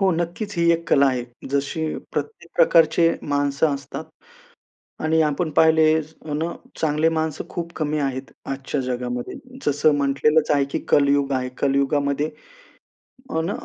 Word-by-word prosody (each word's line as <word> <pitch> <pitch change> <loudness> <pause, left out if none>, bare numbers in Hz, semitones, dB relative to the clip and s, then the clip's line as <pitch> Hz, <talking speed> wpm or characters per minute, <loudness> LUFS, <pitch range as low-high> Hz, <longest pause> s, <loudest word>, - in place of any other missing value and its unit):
हो. 195 -1 +4
नक्कीच. 175 +5 -3
ही 170 0 +4
एक 165 0 -2
कला 140 -1 +5
आहे. 125 -2 0 0.3
जशी 140 +3 -1 0.3
प्रत्येक 445 - -5
प्रकारचे 165 - +5
माणसं 145 +1 +1
असतात 140 +3 -7 1.0
आणि 160 +1 +2
आपण 155 +2 0
पाहिले 160 +1 +5 0.4
अन 150 +2 -1 0.4
चांगले 155 0 +2
माणसं 160 -2 -2
खूप 170 0 -5
कमी 155 -1 -1
आहेत 135 -2 -3 0.2
आजच्या 135 +1 -3
जगामध्ये. 125 -1 -3 0.3
जसं 145 +1 +3
म्हटलेलंच 145 +2 +2
आहे, 145 -2 +3
की 140 - -3
कलयुग 140 -1 +3
आहे, 130 -1 -1
कलयुगामध्ये 140 +1 +1 1.1
अन 165 +4 0
150 Hz, 130 wpm, -22 LUFS, 140-160 Hz, 1.1 s, कला